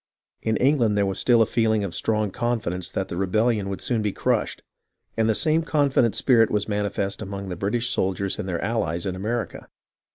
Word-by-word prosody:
In 110 0 0
Eng 140 +3 +3
land 110 -4 +2
there 100 - +3
was 95 -1 -2
still 120 -2 +4
a - - 0
feeling 110 -2 +1
of 95 -4 -4
strong 105 -1 0
confidence 110 -7 -2
that - - -2
the 85 - -5
rebellion 105 +2 +1
would 100 - -4
soon 120 -3 0
be 105 -1 0
crushed, - - -1 0.5
and 110 0 +1
the 110 - +2
same 155 +4 +2
confident 140 -7 +2
spirit 115 -4 +4
was 105 -1 -1
manifest 100 -1 -2
among 100 -1 -6
the 90 - -4
British 115 +7 -1
soldiers 95 +1 -1
and 95 - -4
their 85 -2 -2
allies 85 -7 -1
in 95 -2 -2
America. 110 +2 -4
105 Hz, 200 wpm, -24 LUFS, 95-115 Hz, 0.5 s, still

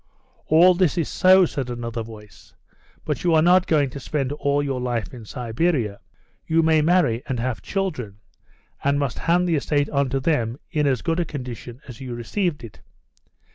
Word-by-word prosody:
"All 170 +4 +6
this 180 -2 +1
is 165 - 0
so," 185 0 +5
said 135 -6 -4
another 120 -1 -4
voice, 110 -2 -13 0.5
"but - - -3
you 170 -2 +3
are 155 - +5
not 180 +2 +4
going 145 -4 +2
to 140 - -7
spend 135 -1 -2
all 145 0 0
your 135 -3 -2
life 120 -2 -3
in 120 -3 -10
Siberia. 120 -1 -1 0.5
You 165 +1 +3
may 160 -1 +4
marry, 150 -8 +2
and 125 -3 -2
have 120 -5 -2
children, 150 - -3 0.7
and 140 +1 +2
must 140 -4 -2
hand 175 +2 +2
the 165 -3 +2
estate 145 0 0
on 140 -2 +1
to 135 +1 -1
them 130 -5 0
in 150 -3 +1
as 130 -3 0
good 165 0 0
a - - +2
condition 125 -3 -8
as 125 -2 -10
you 125 -2 -5
received 145 - -2
it. 110 -4 -11
140 Hz, 185 wpm, -23 LUFS, 120-165 Hz, 0.7 s, All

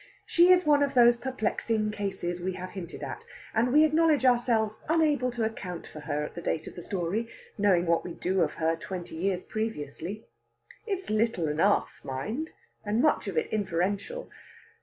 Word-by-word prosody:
She 345 +1 +5
is 365 0 +6
one 295 -1 +5
of 280 -1 +1
those 240 -1 +7
perplexing 225 -3 -1
cases 190 -4 -3
we 185 +1 -2
have 185 0 -7
hinted 180 -3 -7
at, - - -6 0.3
and 235 +3 +2
we 300 +3 +6
acknowledge 310 -3 +3
ourselves 235 -3 +3
unable 300 -6 +3
to 240 -2 -2
account 185 -6 -4
for 155 - -10
her 150 0 -2
at - - -6
the 170 - -6
date 160 - -2
of - - -8
the 175 - -8
story, 195 +5 -2 0.3
knowing 195 -4 +3
what 170 -1 +2
we 175 - -7
do 185 +1 0
of 155 -3 +1
her 165 0 0
twenty 175 0 -7
years 185 +2 -1
previously. 210 -1 -4 0.6
It's 385 - -3
little 215 -6 +1
enough, 165 +7 +1
mind, 215 - -4 0.3
and 210 +1 0
much 300 -5 +2
of 190 -5 -3
it 155 - 0
inferential. 200 - -2
210 Hz, 180 wpm, -28 LUFS, 175-245 Hz, 0.6 s, those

